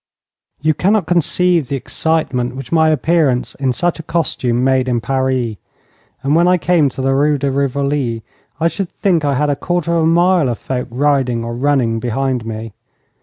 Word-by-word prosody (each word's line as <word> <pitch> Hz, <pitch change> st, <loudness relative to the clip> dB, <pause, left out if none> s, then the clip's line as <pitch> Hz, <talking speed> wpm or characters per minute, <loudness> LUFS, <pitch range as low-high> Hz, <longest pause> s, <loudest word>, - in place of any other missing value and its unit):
You 155 Hz, 0 st, +3 dB
cannot 200 Hz, +3 st, +1 dB
conceive 175 Hz, -2 st, +1 dB
the 140 Hz, -, -2 dB
excitement 135 Hz, -3 st, -1 dB
which 130 Hz, -2 st, -8 dB
my 160 Hz, -1 st, +4 dB
appearance 155 Hz, -4 st, +1 dB
in 135 Hz, -2 st, -1 dB
such 175 Hz, +6 st, -1 dB
a -, -, -3 dB
costume 130 Hz, -7 st, -1 dB
made 130 Hz, -1 st, +2 dB
in 120 Hz, -1 st, +1 dB
Paris, 130 Hz, -2 st, -1 dB, 0.7 s
and 140 Hz, +3 st, +2 dB
when 170 Hz, +1 st, +4 dB
I 180 Hz, 0 st, +4 dB
came 165 Hz, -4 st, +2 dB
to 130 Hz, -, -6 dB
the 135 Hz, 0 st, +2 dB
Rue 145 Hz, +2 st, +2 dB
de 140 Hz, 0 st, -1 dB
Rivoli 140 Hz, -3 st, -1 dB, 0.4 s
I 165 Hz, -, +2 dB
should 185 Hz, +1 st, -3 dB
think 175 Hz, -6 st, 0 dB
I 140 Hz, -1 st, +1 dB
had 145 Hz, +2 st, +1 dB
a -, -, 0 dB
quarter 175 Hz, +2 st, -1 dB
of 165 Hz, -, +2 dB
a 160 Hz, -, +2 dB
mile 170 Hz, -3 st, +3 dB
of 120 Hz, -, -2 dB
folk 125 Hz, -1 st, -4 dB
riding 130 Hz, -2 st, 0 dB
or 115 Hz, -, -4 dB
running 125 Hz, -3 st, +1 dB
behind 125 Hz, 0 st, -2 dB
me. 110 Hz, -1 st, -6 dB
140 Hz, 185 wpm, -17 LUFS, 125-165 Hz, 0.7 s, my